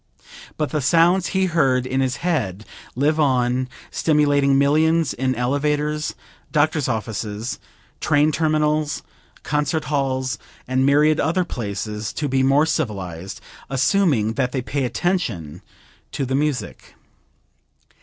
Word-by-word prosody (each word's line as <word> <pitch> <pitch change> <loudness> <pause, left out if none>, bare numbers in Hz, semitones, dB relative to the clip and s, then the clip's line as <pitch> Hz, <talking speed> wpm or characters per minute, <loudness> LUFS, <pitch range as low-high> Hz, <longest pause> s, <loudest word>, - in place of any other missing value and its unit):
But 150 -2 -1
the 150 - 0
sounds 170 +6 +3
he 190 0 +1
heard 135 -8 +2
in 130 +1 0
his 130 -1 0
head 110 - -1 0.3
live 150 +5 +1
on, 130 -3 +1 0.2
stimulating 145 -3 +3
millions 155 +2 +3
in 130 0 -1
elevators, 150 +4 -1 0.4
doctors' 150 -2 +2
offices, 110 0 -3 0.4
train 150 +2 +3
terminals, 155 -1 0 0.4
concert 150 +2 0
halls 130 -3 -1 0.3
and 130 +1 +2
myriad 150 +2 +4
other 175 +4 +1
places 105 -4 -4
to 150 - -2
be 135 -1 +1
more 135 +3 +4
civilized, 95 - -3 0.3
assuming 135 - +2
that 125 0 -1
they 130 -3 -2
pay 135 +1 -2
attention 115 - -2 0.5
to 135 - -1
the 130 - -3
music. 145 -1 -2
140 Hz, 120 wpm, -21 LUFS, 125-155 Hz, 0.5 s, myriad